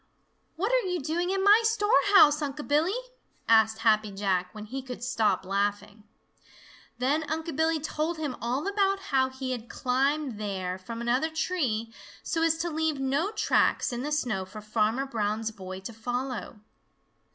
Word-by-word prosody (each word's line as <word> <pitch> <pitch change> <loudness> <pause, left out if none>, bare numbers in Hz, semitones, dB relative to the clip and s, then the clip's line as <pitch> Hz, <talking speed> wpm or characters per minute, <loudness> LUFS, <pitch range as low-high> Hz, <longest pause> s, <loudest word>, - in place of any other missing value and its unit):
"What 395 +8 -1
are - - +2
you 360 -1 -1
doing 330 +5 -1
in 385 0 0
my 415 +3 +7
storehouse, 415 -8 +5
Unc' 290 0 -4
Billy?" 310 +8 +2 0.5
asked 220 -1 +5
Happy 215 -1 +4
Jack, 195 -2 -1
when 215 +1 -8
he 265 +5 -5
could 250 -2 -8
stop 215 -6 +1
laughing. 205 +2 -2 0.9
Then 275 +5 +1
Unc' 320 0 -3
Billy 320 +1 +2
told 310 +2 -2
him 295 -5 -3
all 250 +7 -1
about 395 -1 +1
how 260 -1 +3
he 260 0 -5
had 240 -2 -5
climbed 265 -1 0
there 190 -3 -3
from 230 +5 -7
another 250 +6 +1
tree, 260 -10 -1 0.3
so 325 - -1
as 325 -1 +3
to 340 +1 -2
leave 315 -2 -1
no 275 +8 0
tracks 430 - +1
in 240 - -3
the 295 +3 -3
snow 245 -10 0
for 190 +3 -10
Farmer 215 +4 0
Brown's 220 -3 -2
boy 185 -2 -8
to 230 - -7
follow. 245 -1 -4
260 Hz, 165 wpm, -28 LUFS, 215-320 Hz, 0.9 s, my